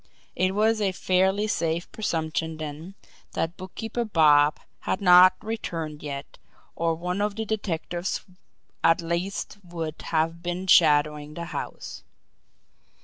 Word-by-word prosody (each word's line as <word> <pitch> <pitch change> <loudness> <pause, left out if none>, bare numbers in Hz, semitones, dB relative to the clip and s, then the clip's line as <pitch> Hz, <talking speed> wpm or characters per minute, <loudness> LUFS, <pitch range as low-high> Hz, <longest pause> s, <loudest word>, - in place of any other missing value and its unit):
It 185 +1 +1
was 220 +1 +2
a 195 -2 +1
fairly 190 +3 +2
safe 170 -4 -1
presumption 160 -5 -2
then 155 +5 -7 0.4
that 165 +2 -2
Bookkeeper 225 +5 -4
Bob 150 -7 +4 0.2
had 190 - -2
not 185 -1 +7
returned 165 -9 -4
yet, 140 -1 -7 0.4
or 165 0 0
one 180 +4 -3
of 205 -1 0
the 220 +1 -3
detectives 180 -4 -3 0.6
at 165 - +4
least 180 +5 -3
would 165 -3 -6
have 165 +1 0
been 175 +1 -3
shadowing 150 -3 +4
the 170 - -5
house. - - -6
175 Hz, 125 wpm, -26 LUFS, 160-195 Hz, 0.6 s, not